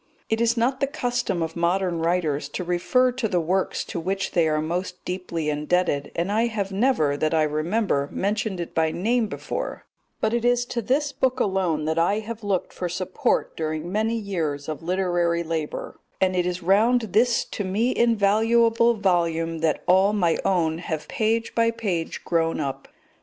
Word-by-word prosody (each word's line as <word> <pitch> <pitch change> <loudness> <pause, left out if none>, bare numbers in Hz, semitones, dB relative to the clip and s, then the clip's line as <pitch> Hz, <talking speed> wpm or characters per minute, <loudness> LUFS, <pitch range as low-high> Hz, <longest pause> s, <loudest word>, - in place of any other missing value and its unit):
It 225 +1 +1
is 235 +1 +2
not 255 +3 +1
the 275 - +1
custom 245 - -1
of 160 0 -5
modern 175 0 0
writers 160 -4 0
to - - -3
refer 180 +9 +2
to 250 -2 -2
the 180 -4 +1
works 185 +3 0
to - - -4
which 190 +3 -2
they 170 -2 +3
are 155 0 +1
most 180 +3 -3
deeply 180 -4 -3
indebted, 150 0 0
and 175 +4 -1
I 225 +3 +2
have 205 -4 -3
never, 195 - +2
that 155 +2 +1
I 155 - +3
remember, 155 0 0
mentioned 205 -1 -1
it 170 - -5
by 160 -1 +2
name 225 +6 +1
before; - - -5 0.3
but 220 - 0
it 235 -1 0
is 245 0 +2
to 235 - -2
this 275 +6 0
book 260 -1 0
alone 185 -8 0
that 160 +1 0
I 185 +5 +2
have 220 +1 -6
looked 195 -3 -1
for 180 - -3
support 185 +1 -1
during 155 +1 -3
many 220 +3 0
years 165 -10 -3
of 155 -3 -4
literary 175 -1 0
labour, 160 -2 -4 0.2
and 185 -1 +2
it 180 -1 +1
is 180 0 -3
round 220 +7 +4
this 235 +1 +3
to 205 - -3
me 215 +7 0
invaluable 230 +1 +3
volume 165 -4 0
that 160 -1 0
all 190 +3 +4
my 175 -6 +1
own 165 -4 +1
have 160 -3 -4
page 225 +1 0
by 230 0 +3
page 195 -8 -3
grown 165 -1 +1
up. 140 -3 -4
185 Hz, 180 wpm, -24 LUFS, 165-225 Hz, 0.3 s, round